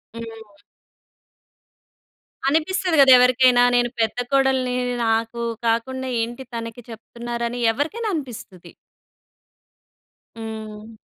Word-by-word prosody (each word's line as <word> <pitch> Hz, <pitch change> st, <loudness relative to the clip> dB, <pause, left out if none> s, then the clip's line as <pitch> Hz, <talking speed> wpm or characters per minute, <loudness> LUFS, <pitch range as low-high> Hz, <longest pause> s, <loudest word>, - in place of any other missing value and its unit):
హ్మ్. 225 Hz, -3 st, -10 dB, 1.9 s
అనిపిస్తది 325 Hz, +3 st, 0 dB
గదెవరికైనా. 250 Hz, -1 st, +6 dB
నేను 240 Hz, 0 st, +2 dB
పెద్ద 220 Hz, +1 st, 0 dB
కోడల్నీ. 265 Hz, -2 st, +2 dB, 0.3 s
నాకూ 225 Hz, +1 st, -1 dB, 0.2 s
కాకుండా 260 Hz, +3 st, -1 dB
ఏంటి 240 Hz, +3 st, -5 dB
తనకి 230 Hz, 0 st, -6 dB
చెప్తున్నారని 235 Hz, +1 st, -5 dB
ఎవరికైన 320 Hz, -, -3 dB
అనిపిస్తది. 240 Hz, -, -7 dB, 1.7 s
హ్మ్. 220 Hz, -1 st, -8 dB
240 Hz, 75 wpm, -22 LUFS, 225-260 Hz, 1.9 s, గదెవరికైనా